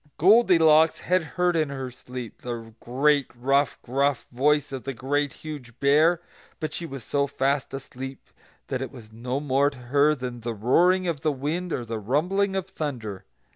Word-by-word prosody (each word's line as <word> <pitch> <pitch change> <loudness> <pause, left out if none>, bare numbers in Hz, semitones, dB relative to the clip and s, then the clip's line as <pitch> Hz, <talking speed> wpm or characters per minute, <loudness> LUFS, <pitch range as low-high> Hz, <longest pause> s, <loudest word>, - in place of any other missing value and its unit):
Goldilocks 165 -5 +5
had 185 0 +2
heard 180 +3 0
in 155 -3 +1
her 135 -2 -5
sleep 125 -2 -9
the 115 -2 -6
great, 140 +3 +2
rough, 135 +2 +1
gruff 140 +1 0
voice 145 +4 +2
of 135 -2 -5
the 135 -1 -4
Great 145 +3 0
Huge 130 -6 -9
Bear; 155 +5 +4 0.4
but 155 -2 -3
she 170 - -4
was 135 -5 -7
so 140 +3 0
fast 140 0 0
asleep 135 0 -8 0.4
that 130 - -3
it 130 - -3
was 115 -5 -13
no 125 +4 -3
more 140 0 +2
to 140 - -14
her 140 +5 +2
than 125 -3 -6
the 115 0 -4
roaring 180 - +3
of 160 -5 -2
wind 155 +4 -1
or 120 - -2
the 115 -1 -4
rumbling 180 - 0
of 190 -1 -2
thunder. 125 - -5
140 Hz, 175 wpm, -25 LUFS, 125-155 Hz, 0.4 s, Goldilocks